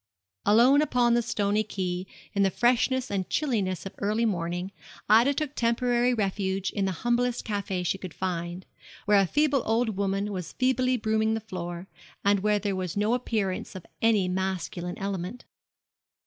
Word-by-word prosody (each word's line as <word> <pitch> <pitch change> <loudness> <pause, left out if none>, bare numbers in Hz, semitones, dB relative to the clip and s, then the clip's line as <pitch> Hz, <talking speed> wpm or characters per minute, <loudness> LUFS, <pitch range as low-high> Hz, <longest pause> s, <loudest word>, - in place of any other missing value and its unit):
Alone 245 +7 +6
upon 245 -5 +2
the 240 - +3
stony 215 -2 0
quay, 185 -3 -3 0.3
in 200 - +1
the 195 - +4
freshness 250 +4 +1
and 190 -2 -2
chilliness 205 - -1
of 195 - -6
early 215 +3 +1
morning, 175 -2 -2 0.4
Ida 230 +6 +6
took 300 -2 -2
temporary 240 0 +2
refuge 195 -3 -1
in 200 - -1
the 190 - 0
humblest 240 0 +1
café 200 -3 -2
she 190 - 0
could 185 -3 -7
find, 175 -1 -3 0.4
where 205 -1 +5
a 195 - +3
feeble 290 - +2
old 225 +1 +1
woman 200 +1 -1
was 180 -4 -5
feebly 255 0 +1
brooming 220 0 +1
the - - -1
floor, 175 -3 -6 0.4
and 200 0 +4
where 210 +1 +2
there 200 -1 -2
was 185 0 -3
no 210 +3 +2
appearance 215 -8 -2
of 185 - -8 0.2
any 215 -5 +3
masculine 180 -1 -3
element. 195 +2 -4
205 Hz, 160 wpm, -27 LUFS, 190-235 Hz, 0.4 s, Alone